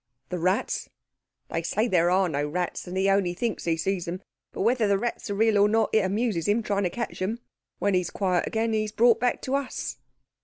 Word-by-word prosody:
"The 180 - -3
rats?" 185 +4 0 0.6
"They 165 - -1
say 210 +7 0
there 175 -5 +3
are 185 +1 +3
no 145 -2 -1
rats 175 +3 -2
that 180 +1 -5
he 190 +1 +2
only 195 -3 +2
thinks 230 +3 -2
he 165 -1 +1
sees 185 +1 -1
them. 180 +2 -5 0.3
But - - -5
whether 230 +1 +2
the 200 -1 +3
rats 235 +1 -3
are 200 - -1
real 220 0 +3
or 205 +1 +5
not 225 +1 +2
it 220 - +6
amuses 195 -3 0
him 215 +3 +2
trying 200 -2 0
to - - +1
catch 235 +7 -5
them. 200 +5 -1 0.4
When 200 0 +1
he 180 - +3
is 175 - -5
quiet 185 -3 0
again, 225 0 0
he 215 -1 +1
is 210 - -5
brought 230 +1 +4
back 245 +1 0
to 260 - -3
us." 275 -2 -2
200 Hz, 235 wpm, -26 LUFS, 180-225 Hz, 0.6 s, it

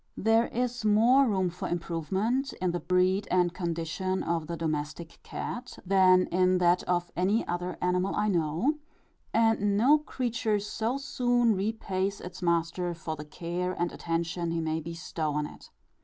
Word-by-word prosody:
There 225 +2 +3
is 245 -1 -2
more 235 +6 +5
room 190 -5 +1
for 180 - -5
improvement, 190 - -1
in 185 -1 -1
the 175 - -2
breed 185 +3 +1
and 180 -1 +2
condition 170 +2 -2
of 165 -2 -1
the 170 +1 -4
domestic 155 +1 -4
cat, 250 +1 -6
than 185 -1 +5
in 185 +1 +3
that 175 0 +3
of 175 -1 0
any 195 +5 +1
other 175 +1 -3
animal 180 +2 +1
I 210 - +1
know; 175 - +1 0.5
and 220 -3 +2
no 280 +8 +5
creature 235 -7 -1
so 220 +5 -2
soon 245 -4 +2
repays 195 -1 -2
its 180 +1 -9
master, 170 0 0
for 160 -1 -5
the 150 0 -8
care 175 +3 -3
and 175 0 0
attention 170 0 -2
he 165 0 -1
may 160 0 -1
bestow 165 -1 -4
on 150 0 -1
it. - - -12
180 Hz, 155 wpm, -28 LUFS, 170-215 Hz, 0.5 s, more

